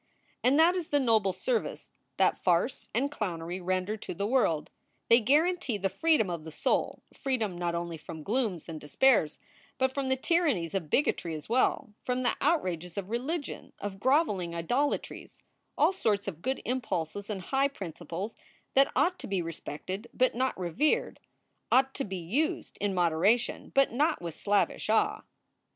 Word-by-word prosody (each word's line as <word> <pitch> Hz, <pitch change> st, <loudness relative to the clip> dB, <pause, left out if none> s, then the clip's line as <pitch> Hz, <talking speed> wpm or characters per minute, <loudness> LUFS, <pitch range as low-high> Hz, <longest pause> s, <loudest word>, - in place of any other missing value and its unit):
And 265 Hz, +3 st, +4 dB
that 335 Hz, +3 st, +6 dB
is 350 Hz, -4 st, -2 dB
the 290 Hz, -, +2 dB
noble 220 Hz, -7 st, +3 dB
service 475 Hz, -, -2 dB, 0.3 s
that -, -, +4 dB
farce -, -, 0 dB
and 280 Hz, +2 st, 0 dB
clownery 180 Hz, -, -4 dB
render 185 Hz, +4 st, -1 dB
to 205 Hz, -, -7 dB
the 200 Hz, -, -2 dB
world. 210 Hz, -, +1 dB, 0.4 s
They 235 Hz, -, +8 dB
guarantee 295 Hz, -, +2 dB
the 195 Hz, 0 st, 0 dB
freedom 310 Hz, -, +2 dB
of 170 Hz, -3 st, -4 dB
the 160 Hz, -, -7 dB
soul, 155 Hz, -, -1 dB
freedom 230 Hz, -9 st, -1 dB
not 175 Hz, -1 st, -2 dB
only 170 Hz, -1 st, -3 dB
from 155 Hz, 0 st, -9 dB
glooms 215 Hz, -, -1 dB
and 160 Hz, -2 st, -7 dB
despairs, 165 Hz, -, +3 dB, 0.4 s
but 260 Hz, 0 st, +1 dB
from 275 Hz, -1 st, -2 dB
the 265 Hz, -, +3 dB
tyrannies 265 Hz, -, +1 dB
of 180 Hz, -6 st, -2 dB
bigotry 170 Hz, -, +1 dB
as 155 Hz, -, -8 dB
well, 250 Hz, -1 st, +1 dB
from 250 Hz, 0 st, -1 dB
the 245 Hz, -, +2 dB
outrages 180 Hz, -, 0 dB
of 200 Hz, +1 st, -4 dB
religion, 285 Hz, +6 st, -3 dB
of 195 Hz, -1 st, -6 dB
groveling 210 Hz, -, +2 dB
idolatries, 245 Hz, -, -2 dB, 0.4 s
all -, -, +4 dB
sorts 210 Hz, -, 0 dB
of 170 Hz, -4 st, -5 dB
good 265 Hz, +5 st, -2 dB
impulses 205 Hz, -6 st, -2 dB
and 205 Hz, -2 st, -3 dB
high 270 Hz, +5 st, +2 dB
principles 190 Hz, -, -6 dB, 0.4 s
that 275 Hz, +1 st, +5 dB
ought 360 Hz, +1 st, +2 dB
to -, -, -7 dB
be 195 Hz, -2 st, 0 dB
respected 185 Hz, +6 st, -6 dB
but 255 Hz, +1 st, +3 dB
not 255 Hz, -3 st, -1 dB
revered, 275 Hz, -, 0 dB, 0.5 s
ought 265 Hz, +1 st, +4 dB
to 275 Hz, -, -3 dB
be 190 Hz, -2 st, -4 dB
used 280 Hz, -, -1 dB
in 200 Hz, -2 st, 0 dB
moderation 180 Hz, +7 st, +2 dB
but 275 Hz, 0 st, +4 dB
not 300 Hz, +6 st, +2 dB
with 170 Hz, -2 st, -5 dB
slavish 205 Hz, +3 st, 0 dB
awe. 220 Hz, -, +2 dB
215 Hz, 165 wpm, -29 LUFS, 175-270 Hz, 0.5 s, They